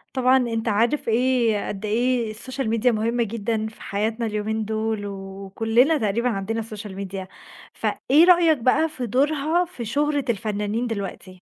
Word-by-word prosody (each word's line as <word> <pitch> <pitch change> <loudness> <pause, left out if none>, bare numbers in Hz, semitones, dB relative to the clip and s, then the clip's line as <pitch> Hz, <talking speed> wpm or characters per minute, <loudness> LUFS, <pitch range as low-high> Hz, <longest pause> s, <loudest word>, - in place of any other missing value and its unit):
طبعًا 255 0 +4
أنت 235 -3 -1
عارف 230 +6 +1
إيه 235 -2 +2
قد 205 +1 -5
إيه 235 +1 0
الSocial 260 +5 -4
Media 230 +2 0
مهمة 230 +2 0
جدًا 220 0 -2
في 220 - -13
حياتنا 220 +3 -2
اليومين 215 0 -2
دول، 220 -1 -2
وكلّنا 200 +8 0
تقريبًا 230 +1 0
عندنا 225 +1 -2
الSocial 215 -1 -7
Media 190 0 -6 0.5
فإيه 300 +5 +3
رأيك 345 -3 +5
بقى 260 +6 +2
في 260 -5 -5
دورها 295 - +1
في 295 -10 -7
شُهرة 290 +3 0
الفنانين 215 +1 -1
دلوقتي؟ 195 -4 -6
225 Hz, 145 wpm, -23 LUFS, 210-255 Hz, 0.5 s, رأيك